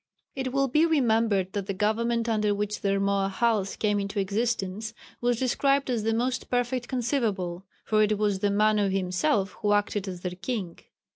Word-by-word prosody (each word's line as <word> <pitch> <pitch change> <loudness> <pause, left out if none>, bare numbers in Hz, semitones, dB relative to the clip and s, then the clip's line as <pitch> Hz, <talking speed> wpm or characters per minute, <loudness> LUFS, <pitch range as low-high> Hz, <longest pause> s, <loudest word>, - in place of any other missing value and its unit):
It 265 -1 -3
will 275 +1 +2
be 300 +5 +3
remembered 225 - +2
that 200 -2 -3
the 195 - -2
government 230 +3 0
under 210 -2 +1
which 210 +1 -3
the 200 - 0
Rmoahals 200 +1 0
came 205 -1 +1
into 200 +1 -3
existence, 215 +1 -2 0.3
was 245 -1 +1
described 275 +2 +1
as 235 -3 0
the 225 +1 0
most 255 +2 -1
perfect 245 0 -1
conceivable, 210 -8 -2 0.2
for 215 -1 +2
it 215 0 +2
was 205 -2 0
the 205 - +1
Manu 210 0 +3
himself 195 +4 0
who 205 -1 +2
acted 205 -1 0
as 180 -2 -6
their 180 - -3
king. 185 -1 -4
215 Hz, 170 wpm, -27 LUFS, 195-240 Hz, 0.3 s, be